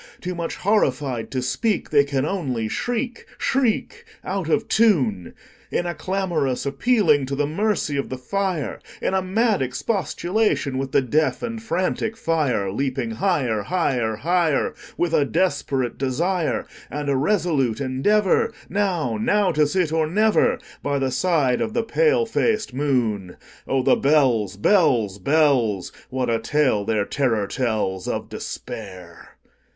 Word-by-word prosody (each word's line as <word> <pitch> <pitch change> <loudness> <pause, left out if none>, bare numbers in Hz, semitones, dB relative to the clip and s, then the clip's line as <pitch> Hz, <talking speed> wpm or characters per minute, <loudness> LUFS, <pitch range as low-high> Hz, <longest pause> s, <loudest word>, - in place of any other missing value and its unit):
Too 180 - -4
much 170 -1 -4
horrified 135 - 0
to 130 -1 -2
speak, 215 - -1
They 145 -2 +5
can 140 -1 -1
only 135 - -2
shriek, 245 - -3
shriek, 270 - 0 0.2
Out 185 -3 -3
of 220 +7 +1
tune, 130 - +2 0.3
In 175 - -1
a 175 - -2
clamorous 175 -10 -1
appealing 150 - +2
to 140 - -2
the 145 +1 +1
mercy 165 -2 -1
of 140 - -2
the 130 - -4
fire, 185 +2 -2 0.2
In - - -1
a 190 - +2
mad 210 - +1
expostulation 175 - -1
with 135 -1 -3
the 135 - +3
deaf 150 +5 0
and 230 -1 -4
frantic 220 +2 -1
fire, 145 - 0
Leaping 130 +1 -2
higher, 120 - 0
higher, 125 - 0
higher, 165 +3 +1 0.2
With 175 -2 0
a 150 - +4
desperate 135 -6 -1
desire, 160 +7 0 0.2
And 145 0 -4
a 140 - +2
resolute 150 - +1
endeavorNow—now 185 - +1
to 150 -2 +2
sit 175 0 0
or 160 -1 +2
never, 210 +6 +3 0.2
By 145 0 -1
the 135 -1 0
side 140 -3 +1
of 225 -1 -2
the - - +1
pale 470 - +2
faced 445 -1 0
moon. 120 -9 -1 0.3
Oh, 135 -1 +1
the - - +5
bells, 125 -9 +2
bells, 115 - +3
bells! 130 - +2 0.2
What 130 -2 -1
a 115 - +1
tale 115 -3 +1
their 110 -2 0
terror 115 -7 0
tellsOf 105 -6 -2
Despair! 90 -6 -8
145 Hz, 140 wpm, -22 LUFS, 125-190 Hz, 0.3 s, They